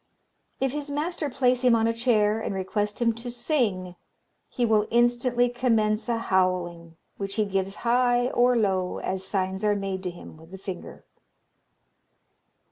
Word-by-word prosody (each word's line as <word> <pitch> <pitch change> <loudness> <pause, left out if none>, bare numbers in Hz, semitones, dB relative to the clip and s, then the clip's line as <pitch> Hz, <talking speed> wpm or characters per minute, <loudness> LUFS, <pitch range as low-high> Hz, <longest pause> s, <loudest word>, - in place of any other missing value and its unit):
"If 270 -1 +1
his 290 +1 -5
master 300 +1 -2
place 250 -1 +2
him 250 -2 +5
on 225 0 +2
a 230 - +2
chair, 220 -3 +2
and 200 - -3
request 205 +2 -2
him 230 -1 +2
to 235 +2 -7
sing, 230 - -1 0.5
he 245 - 0
will 215 -2 +2
instantly 240 +1 +2
commence 230 -3 +1
a 235 - +1
howling, 180 -5 -1 0.2
which 195 0 -4
he 215 - +1
gives 195 0 -2
high 245 0 +3
or 245 0 +3
low 190 -4 0
as 190 0 -3
signs 190 0 -2
are 210 -1 +3
made 195 -2 -3
to 185 - -3
him 175 -2 -11
with 160 +1 -16
the 190 - -9
finger. 190 -2 -8
215 Hz, 160 wpm, -26 LUFS, 190-245 Hz, 0.5 s, him